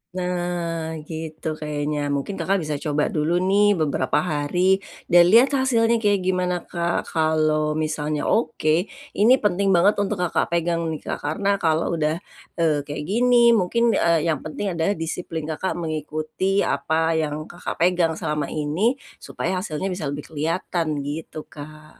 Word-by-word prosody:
Nah, 175 Hz, -3 st, -2 dB
gitu 160 Hz, 0 st, -7 dB
kayaknya. 150 Hz, -1 st, -2 dB
Mungkin 165 Hz, +8 st, -4 dB
Kakak 195 Hz, -2 st, 0 dB
bisa 150 Hz, -1 st, -2 dB
coba 150 Hz, 0 st, -1 dB
dulu 170 Hz, +3 st, +1 dB
nih 205 Hz, +2 st, +4 dB
beberapa 145 Hz, -5 st, 0 dB
hari, 180 Hz, +4 st, +1 dB, 0.3 s
dan 175 Hz, 0 st, +7 dB
lihat 235 Hz, +8 st, +6 dB
hasilnya 235 Hz, -4 st, +2 dB
kayak 205 Hz, -3 st, +2 dB
gimana 180 Hz, -1 st, 0 dB
Kak. 170 Hz, 0 st, -2 dB
Kalau 155 Hz, -1 st, +1 dB
misalnya 155 Hz, -1 st, -2 dB
oke, 175 Hz, -5 st, +1 dB, 0.3 s
ini 225 Hz, +5 st, +6 dB
penting 200 Hz, -1 st, +1 dB
banget 200 Hz, +4 st, +4 dB
untuk 205 Hz, +1 st, 0 dB
Kakak 175 Hz, -, 0 dB
pegang 170 Hz, -1 st, 0 dB
nih 160 Hz, -2 st, -4 dB
Kak. -, -, -4 dB
Karena 200 Hz, +6 st, 0 dB
kalau 160 Hz, -1 st, +1 dB
udah, 155 Hz, +1 st, +1 dB, 0.4 s
eee, 160 Hz, -3 st, +2 dB
kayak 145 Hz, +1 st, -4 dB
gini, 235 Hz, +5 st, +4 dB
mungkin, 230 Hz, +3 st, +2 dB
eee, 170 Hz, -6 st, +2 dB
yang 150 Hz, -, -1 dB
penting 190 Hz, +5 st, -4 dB
adalah 170 Hz, +4 st, 0 dB
disiplin 165 Hz, 0 st, -4 dB
Kakak 160 Hz, +4 st, -3 dB
mengikuti 155 Hz, +4 st, -1 dB
apa 160 Hz, +3 st, 0 dB
yang 155 Hz, -1 st, -2 dB
Kakak 175 Hz, +2 st, -7 dB
pegang 170 Hz, -2 st, +2 dB
selama 150 Hz, -3 st, -2 dB
ini, 160 Hz, -, 0 dB, 0.2 s
supaya 185 Hz, +1 st, -3 dB
hasilnya 185 Hz, 0 st, -3 dB
bisa 180 Hz, -5 st, -3 dB
lebih 145 Hz, +1 st, -4 dB
kelihatan, 160 Hz, -1 st, -2 dB
gitu 155 Hz, +2 st, -6 dB
Kak. 155 Hz, +1 st, -12 dB
165 Hz, 150 wpm, -23 LUFS, 155-190 Hz, 0.4 s, dan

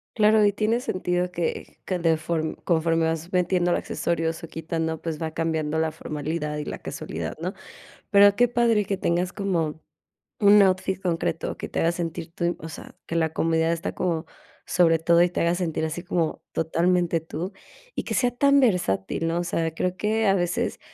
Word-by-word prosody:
Claro, 215 Hz, -1 st, +5 dB
y 205 Hz, -, +4 dB
tiene 220 Hz, +4 st, 0 dB
sentido, 180 Hz, -6 st, -1 dB
que 170 Hz, -2 st, -3 dB
que 185 Hz, -, -1 dB
de 165 Hz, -2 st, +2 dB
form 160 Hz, -1 st, -2 dB
conforme 165 Hz, -1 st, +2 dB
vas 165 Hz, +2 st, -2 dB
metiéndole 180 Hz, -1 st, +2 dB
accesorios, 165 Hz, -1 st, -2 dB
o -, -, -5 dB
quitando, 160 Hz, 0 st, -3 dB
pues, 165 Hz, -1 st, -4 dB
va 160 Hz, -1 st, -2 dB
cambiando 160 Hz, -1 st, -1 dB
la 160 Hz, -1 st, +1 dB
formalidad, 150 Hz, 0 st, -4 dB
y 150 Hz, -, -4 dB
la -, -, -5 dB
casualidad, -, -, -5 dB
¿no? -, -, -2 dB, 0.6 s
Pero, 200 Hz, -1 st, +7 dB
qué 245 Hz, +2 st, +4 dB
padre 230 Hz, -4 st, +2 dB
que 195 Hz, -, -1 dB
tengas 180 Hz, 0 st, 0 dB
como 165 Hz, -6 st, -1 dB, 0.6 s
un 205 Hz, -1 st, +7 dB
outfit 190 Hz, -1 st, +1 dB
concreto 165 Hz, -2 st, -2 dB
que -, -, -5 dB
te -, -, -2 dB
haga 165 Hz, -, +3 dB
sentir 165 Hz, -1 st, -4 dB
tú, 175 Hz, 0 st, -1 dB
o 160 Hz, -, -7 dB
sea, 155 Hz, -, -10 dB
que 165 Hz, -, -5 dB
la 160 Hz, -1 st, +1 dB
comodidad 165 Hz, 0 st, +1 dB
está 165 Hz, +3 st, -3 dB
como 170 Hz, -2 st, -1 dB, 0.4 s
sobre 170 Hz, -2 st, +4 dB
todo, 170 Hz, +1 st, +4 dB
y 175 Hz, -, +2 dB
te -, -, -2 dB
haga 170 Hz, +1 st, +2 dB
sentir 170 Hz, -3 st, -2 dB
así 160 Hz, +3 st, -3 dB
como 170 Hz, -3 st, -1 dB
totalmente 170 Hz, +1 st, +1 dB
tú, 165 Hz, +3 st, -5 dB, 0.4 s
y -, -, -3 dB
que -, -, -4 dB
sea 245 Hz, -1 st, +2 dB
tan 280 Hz, +3 st, +4 dB
versátil, 165 Hz, -, +1 dB
¿no? 165 Hz, +1 st, 0 dB
O 175 Hz, -, -1 dB
sea, 165 Hz, -2 st, -1 dB
creo 180 Hz, +2 st, -2 dB
que 220 Hz, +1 st, +1 dB
a 195 Hz, -, +4 dB
veces, 175 Hz, -1 st, -1 dB
170 Hz, 190 wpm, -25 LUFS, 160-185 Hz, 0.6 s, Pero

